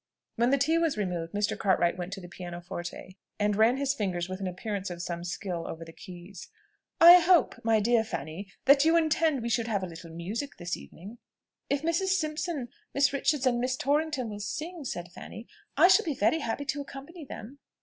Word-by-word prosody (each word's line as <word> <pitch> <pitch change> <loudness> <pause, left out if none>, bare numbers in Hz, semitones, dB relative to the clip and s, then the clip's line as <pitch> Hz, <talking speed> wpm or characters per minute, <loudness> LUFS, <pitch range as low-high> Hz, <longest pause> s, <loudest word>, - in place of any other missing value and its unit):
When 235 +2 +2
the 275 - +4
tea 315 +5 +2
was 325 -8 +1
removed, 175 -5 -2
Mr. 205 0 0
Cartwright 180 -3 +2
went 180 0 -5
to 200 - -5
the 175 - -9
piano 175 0 -7
forte, 175 +1 -7 0.2
and 210 0 +1
run 225 +4 +4
his 275 0 +1
fingers 185 -8 -2
with 185 0 -5
an 195 - -3
appearance 200 +1 -4
of 175 -1 -7
some 170 0 -4
skill 175 0 -4
over 165 0 -7
the 165 - -12
keys. 180 +2 -11 0.5
"I 345 +2 +11
hope, 350 0 +3
my 225 -1 +3
dear 235 +3 +3
Miss 220 - -3
Fanny, 155 +8 -5 0.2
that 280 +1 +7
you 325 +1 +5
intend 315 -4 +2
we 235 - -2
should 230 0 0
have 205 -4 -1
a - - -2
little 165 0 -10
music 195 - -5
this 175 0 -3
evening?" 205 +8 -12 0.5
"If 280 +1 0
Mrs. 375 +4 +1
Simpson, 310 -4 -3 0.3
Miss 280 0 +3
Richards, 280 0 +1
and 245 -2 +2
Miss 255 +1 -1
Torrington 285 -2 0
will 205 - -6
sing," 315 - -5
said 175 -7 -5
Fanny, 225 +5 -10 0.3
"I 330 +5 +8
shall 375 +4 +6
be 310 -5 -2
very 225 +8 +2
happy 285 +1 -3
to 285 +1 -2
accompany 285 +5 -9
them." 260 0 -9
230 Hz, 210 wpm, -28 LUFS, 185-285 Hz, 0.5 s, I